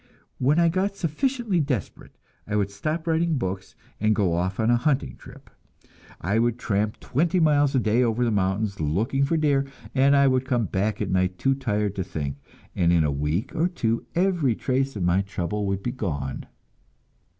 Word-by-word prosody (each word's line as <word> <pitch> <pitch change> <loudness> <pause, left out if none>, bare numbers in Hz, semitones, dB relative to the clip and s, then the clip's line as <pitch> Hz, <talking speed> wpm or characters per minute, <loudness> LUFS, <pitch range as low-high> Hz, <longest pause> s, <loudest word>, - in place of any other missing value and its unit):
When 140 +5 +3
I 170 0 +5
got 190 +4 0
sufficiently 205 - -1
desperate, 135 - -4 0.3
I 105 - -2
would 100 -1 0
stop 155 +11 -3
writing 165 -1 +1
books 95 -4 -4 0.2
and 110 +1 +2
go 95 -5 +1
off 90 +3 -1
on 110 +1 +3
a - - +5
hunting 125 - 0
trip. - - -14 0.7
I 100 +6 0
would 120 0 +1
tramp 105 -2 -1
twenty 170 +7 0
miles 145 -3 +3
a - - +4
day 110 +1 +2
over 120 0 +1
the 115 - +1
mountains, 100 +1 0
looking 110 - 0
for 165 +4 0
deer, 145 -3 +2 0.3
and 140 +1 +4
I 140 0 +5
would 130 -1 +2
come 125 -4 0
back 100 +3 -1
at - - -3
night 90 0 +1
too 135 +6 +2
tired 105 -7 -1
to 95 - 0
think, 70 -5 -4 0.4
and 85 -1 +3
in 85 -2 +4
a 75 - +1
week 75 - -2
or 165 +3 +2
two 115 -10 -2
every 175 - +2
trace 135 +2 -1
of 100 - -3
my 90 +2 +3
trouble 100 +1 -3
would 100 0 -2
be 120 - -1
gone. 70 - -4
115 Hz, 190 wpm, -25 LUFS, 95-140 Hz, 0.7 s, I